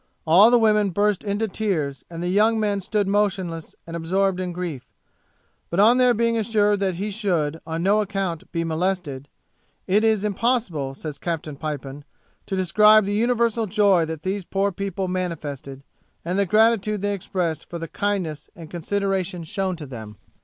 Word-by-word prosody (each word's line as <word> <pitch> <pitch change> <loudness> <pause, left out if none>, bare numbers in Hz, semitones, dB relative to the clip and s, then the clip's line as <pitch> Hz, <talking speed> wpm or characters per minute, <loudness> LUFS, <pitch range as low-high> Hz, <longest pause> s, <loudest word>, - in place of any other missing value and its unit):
All 180 +8 +7
the 245 - +5
women 210 -3 +3
burst 205 +2 +1
into 205 +2 -1
tears, 160 - -2
and 170 0 -6
the - - -1
young 215 +4 +3
men 205 -2 0
stood 205 +1 0
motionless 190 -5 -1
and 165 - -7
absorbed 185 +3 0
in 180 -1 -3
grief; 170 -7 -5 0.9
but 170 - -1
on 230 +5 +6
their 250 -1 +4
being 230 +1 +1
assured 210 -2 +2
that 190 -2 0
he 205 +4 -3
should, 170 -7 -1
on 165 +1 -3
no 205 +3 +3
account, 195 -5 -3
be 165 -1 -1
molested, 160 -5 -2 0.6
'it 205 +4 +2
is 220 -2 +2
impossible,' 205 - -1
says 150 0 -7
Captain 160 -3 -4
Pipon, 145 -1 -6 0.4
'to 195 - -2
describe 210 +4 +5
the 200 - -2
universal 230 0 +1
joy 200 -3 +3
that 160 -1 -6
these 190 +1 -2
poor 195 +3 0
people 195 0 -3
manifested, 145 -7 -4 0.4
and 180 +3 -1
the 200 - +2
gratitude 215 -1 +3
they 205 0 0
expressed 180 -4 -3
for 170 - -5
the 165 0 -5
kindness 180 -7 -2
and 165 -2 -11
consideration 190 0 -2
shown 190 +2 -2
to 160 -3 -8
them.' 110 -5 -9
190 Hz, 170 wpm, -23 LUFS, 165-210 Hz, 0.9 s, All